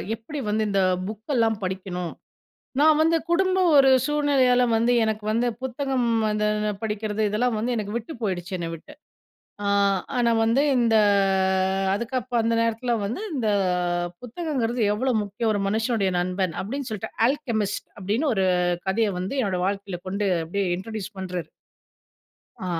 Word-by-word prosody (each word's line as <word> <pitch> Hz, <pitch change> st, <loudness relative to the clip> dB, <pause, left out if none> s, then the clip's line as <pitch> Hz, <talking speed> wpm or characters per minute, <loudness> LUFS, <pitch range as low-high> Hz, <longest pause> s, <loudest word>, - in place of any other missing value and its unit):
எப்படி 280 Hz, +7 st, -7 dB
வந்து 215 Hz, +1 st, +1 dB
இந்த 195 Hz, -1 st, +2 dB, 0.3 s
புக்கெல்லாம் 225 Hz, 0 st, 0 dB
படிக்கணும்." 185 Hz, -2 st, -4 dB, 0.7 s
நான் 310 Hz, 0 st, +5 dB
வந்து 330 Hz, +1 st, +3 dB
குடும்பம் 370 Hz, 0 st, +3 dB
ஒரு 270 Hz, -1 st, +7 dB, 0.2 s
சூழ்நிலையால 275 Hz, -4 st, +3 dB
வந்து 235 Hz, +2 st, +2 dB
எனக்கு 215 Hz, -1 st, -2 dB
வந்து 235 Hz, +2 st, +1 dB, 0.2 s
புத்தகம் 260 Hz, -1 st, -1 dB, 0.2 s
வந்து 210 Hz, 0 st, 0 dB, 0.4 s
படிக்கிறது, 215 Hz, 0 st, -2 dB
இதெல்லாம் 225 Hz, +2 st, 0 dB
வந்து 240 Hz, +3 st, -1 dB
எனக்கு 210 Hz, 0 st, -3 dB
விட்டு 240 Hz, +7 st, -5 dB
போயிடுச்சு 185 Hz, -2 st, -3 dB
என்ன 170 Hz, -1 st, -3 dB
விட்டு, 165 Hz, -, -12 dB, 0.7 s
ஆ -, -, 0 dB, 0.5 s
ஆனா 235 Hz, -1 st, +3 dB
வந்து 230 Hz, +5 st, +3 dB, 0.2 s
இந்த 230 Hz, -2 st, +3 dB, 1.0 s
அதுக்கப்பு 245 Hz, +2 st, -3 dB
அந்த 230 Hz, +1 st, +1 dB
நேரத்தில 230 Hz, +2 st, 0 dB
வந்து 235 Hz, -, -3 dB
இந்த 230 Hz, -6 st, 0 dB, 0.7 s
புத்தகங்கிறது 245 Hz, -3 st, -2 dB
எவ்வளோ 255 Hz, +4 st, 0 dB
முக்கியம் 215 Hz, +2 st, -2 dB
ஒரு 205 Hz, -, -1 dB
மனுஷனுடைய 220 Hz, -2 st, 0 dB
நண்பன் 180 Hz, -1 st, -1 dB
அப்டின்னு 260 Hz, +6 st, -4 dB
சொலலிட்டு 210 Hz, -, -5 dB
ஆலகெமிஸ்ட் 235 Hz, -8 st, -2 dB
அப்டின்னு 225 Hz, +10 st, 0 dB
ஒரு 190 Hz, -1 st, +2 dB, 0.4 s
கதையை 210 Hz, +1 st, +1 dB
வந்து 190 Hz, +10 st, -3 dB
என்னோட 190 Hz, -5 st, -1 dB
வாழ்க்கையில 195 Hz, -2 st, -3 dB
கொண்டு 200 Hz, +1 st, -1 dB, 0.2 s
அப்டியே 195 Hz, +4 st, -1 dB
இன்ட்ரோடியூஸ் 215 Hz, 0 st, -6 dB
பண்றார். 180 Hz, -2 st, -5 dB, 1.2 s
ஆ -, -, -3 dB
225 Hz, 135 wpm, -24 LUFS, 200-250 Hz, 1.2 s, ஒரு